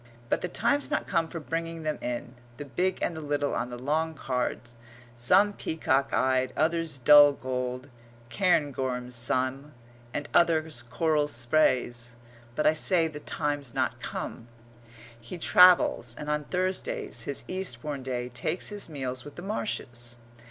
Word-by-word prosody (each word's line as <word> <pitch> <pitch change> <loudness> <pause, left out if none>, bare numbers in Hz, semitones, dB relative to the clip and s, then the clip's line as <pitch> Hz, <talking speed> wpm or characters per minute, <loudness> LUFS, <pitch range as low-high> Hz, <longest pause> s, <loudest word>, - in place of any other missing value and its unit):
but - - +1
the - - -2
time's 280 +10 0
not 300 - -1
come 165 -3 0
for 165 - -6
bringing 165 +1 -4
them 155 -1 -2
in 120 0 -4 0.2
the 145 - -6
big 180 +7 -1
and 170 - -1
the 160 - -6
little 145 -1 -1
on 120 - -2
the 120 - -6
long 155 +5 -1
cards, 125 -3 -3 0.4
some 190 +13 +4
peacock 140 -7 0
eyed, 130 0 +1
others 165 -1 +1
dull 145 +3 +8
gold; 125 0 -4 0.4
cairngorms 135 -9 0
some, 130 +4 -1 0.4
and 145 - -4
others 160 -6 +2
coral 150 +4 0
sprays 120 -2 +1 0.4
but 150 - 0
I 155 - +6
say 165 +1 +2
the 150 -2 -8
time's 145 -3 -3
not - - -1
come. 115 - -6 0.7
He 120 +10 -8
travels, 175 -9 +5
and 150 0 -4
on 150 0 -1
Thursdays, 380 - -2
his 140 - -2
Eastbourne 150 -6 -4
day, 125 -1 -3
takes 125 +9 -3
his 205 -4 -6
meals 130 -4 -4
with 145 - -11
the 175 - -8
Marshes. 120 - -4
145 Hz, 150 wpm, -28 LUFS, 125-165 Hz, 0.7 s, dull